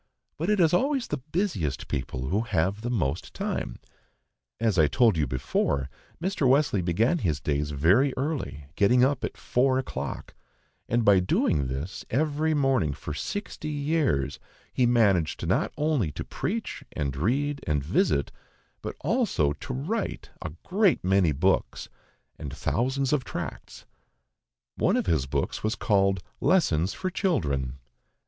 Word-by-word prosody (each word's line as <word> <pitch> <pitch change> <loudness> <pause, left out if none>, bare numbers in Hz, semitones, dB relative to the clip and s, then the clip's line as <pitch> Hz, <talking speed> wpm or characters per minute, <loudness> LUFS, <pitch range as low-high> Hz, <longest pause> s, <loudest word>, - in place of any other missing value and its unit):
But 165 +5 -1
it 210 -1 +3
is 165 -2 +4
always 270 +5 +2
the 150 - -1
busiest 95 - -1
people 65 0 -3
who 100 +6 +1
have 100 -2 0
the 120 - -3
most 85 - -2
time. 65 - -3 0.8
As 110 -6 +2
I 75 - +6
told 115 - +4
you 75 -3 +1
before, 65 +2 -1 0.3
Mr. 165 -6 +1
Wesley 135 -7 +3
began 110 - +1
his 80 - 0
days 75 0 -1
very 90 - +3
early, 135 - -3
getting 120 +5 +4
up 135 0 +2
at - - -3
four 130 +1 +2
o'clock; 130 - -4 0.6
and 120 -1 +2
by 100 -2 +6
doing 75 -6 +1
this 70 +8 -5
every 155 +4 +1
morning 130 - +2
for 75 - -6
sixty 205 - -4
years, 145 - 0 0.3
he 125 - +3
managed 100 -9 +2
not - - +1
only 145 - +1
to - - -5
preach, 225 +3 -4
and 70 -3 -2
read, 140 - 0
and 75 -3 +1
visit, 70 -1 +1 0.5
but - - -5
also 75 -1 +1
to 75 - -8
write 165 - -3
a - - -4
great 195 -1 +2
many 95 -3 +3
books, 90 +7 0 0.5
and 75 -4 -5
thousands 130 - 0
of 140 -4 +1
tracts - - -7 0.9
one - - +2
of - - 0
his 75 -6 +1
books - - -2
was 110 +1 0
called 95 -4 +2 0.2
"Lessons 95 - +2
for 185 -1 -3
Children." 70 - 0
110 Hz, 145 wpm, -27 LUFS, -, 0.9 s, I